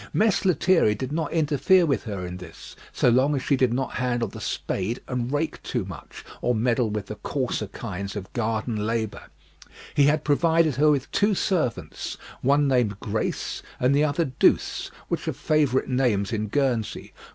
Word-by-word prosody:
Mess 215 -1 +2
Lethierry 175 - +3
did 130 +6 -5
not 155 -1 -2
interfere 165 +3 +3
with 140 -5 0
her 100 -5 -4
in 90 0 -6
this, 90 -2 -11 0.2
so - - +1
long 130 +5 +3
as 135 - -2
she 140 - +2
did 130 -3 +2
not 130 +2 -1
handle 120 -2 0
the - - -9
spade 100 +6 -2
and 125 -1 -2
rake 150 +2 -2
too - - -2
much, - - -10 0.2
or 125 - +1
meddle 115 +1 +1
with 105 -1 -3
the 105 +2 -7
coarser 125 -4 -2
kinds 100 -1 -6
of 100 -2 -7
garden 110 -2 -1
labour. 115 -2 -2 0.7
He 140 - +4
had 150 +2 +2
provided 160 -1 +3
her 150 +2 +5
with 140 -3 0
two 205 0 +2
servants, 165 - -2 0.2
one 140 +2 +3
named 120 -7 +1
Grace, - - -3 0.2
and 125 +2 +3
the 145 - +4
other 155 +2 +1
Douce, 130 -3 +1 0.2
which - - -3
are - - 0
favourite 145 -4 +1
names 120 -6 +1
in 110 -1 -1
Guernsey. 125 -2 -1
130 Hz, 175 wpm, -25 LUFS, 110-145 Hz, 0.7 s, her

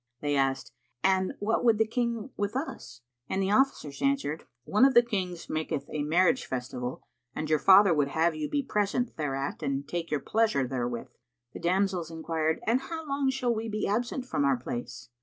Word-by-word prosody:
They 145 -1 0
asked, 135 -3 0 0.3
"And 190 -1 +2
what 220 +4 0
would 230 -3 +4
the 220 - +3
King 235 +1 -2
with 205 +2 -2
us?"; 130 - -5 0.3
and 190 - -1
the 195 0 +1
officers 210 - +1
answered, 275 - 0 0.2
"One 210 - +2
of 270 0 +5
the 240 - +8
Kings 185 -7 -3
maketh 155 -3 -2
a 150 - -1
marriage 180 - +2
festival, 125 0 -4 0.3
and 155 - -3
your 155 0 +2
father 195 +1 +7
would 145 -3 +2
have 160 +4 +1
you 155 -1 -4
be 285 -1 0
present 230 +1 -1
thereat 140 -2 -3
and 140 0 -2
take 170 -1 -3
your 150 - 0
pleasure 215 - +1
therewith." 120 -2 -3 0.4
The - - -7
damsels 180 -1 0
enquired, 160 -1 -1
"And 235 +4 +2
how 320 +3 -6
long 275 -1 +1
shall 255 -2 0
we 225 0 -3
be 215 0 -2
absent 240 +5 -1
from 250 - -1
our 140 -2 +3
place?" 120 +1 -6
185 Hz, 190 wpm, -28 LUFS, 145-230 Hz, 0.4 s, the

